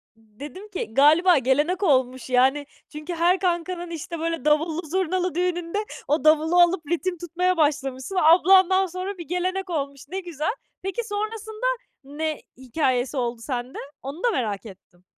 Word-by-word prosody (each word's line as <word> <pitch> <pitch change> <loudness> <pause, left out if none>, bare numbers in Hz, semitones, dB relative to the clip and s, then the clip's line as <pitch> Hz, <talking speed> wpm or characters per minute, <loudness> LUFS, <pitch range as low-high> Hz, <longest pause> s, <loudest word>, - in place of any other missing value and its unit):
Dedim 255 - -11
ki, 365 - -5
galiba 315 +5 +5
gelenek 295 - +1
olmuş 260 -6 +1
yani; 265 +3 +3 0.2
çünkü 305 +4 -6
her 350 +3 +3
kankanın 350 -1 -2
işte 335 +1 -6
böyle 330 -3 -3
davullu, 310 +2 +2
zurnalı 365 0 -1
düğününde 350 +1 -1 0.3
o 300 +2 +1
davulu 315 +3 +4
alıp 345 0 +3
ritim 355 +1 -1
tutmaya 355 +2 -1
başlamışsın. 280 +1 -1
Ablandan 375 +3 +6
sonra 370 +2 -5
bir 340 - -8
gelenek 370 +2 -2
olmuş, 280 -4 -3
ne 380 - -3
güzel. 345 - -3 0.3
Peki, 390 +6 -3
sonrasında 435 +2 -4 0.4
ne 305 +3 -4 0.2
hikâyesi 260 0 -1
oldu 240 -2 -2
sende? 250 0 -5 0.2
Onu 280 - -7
da 480 - +3
merak 220 - -2
ettim. 185 -3 -15
330 Hz, 145 wpm, -24 LUFS, 275-365 Hz, 0.4 s, Ablandan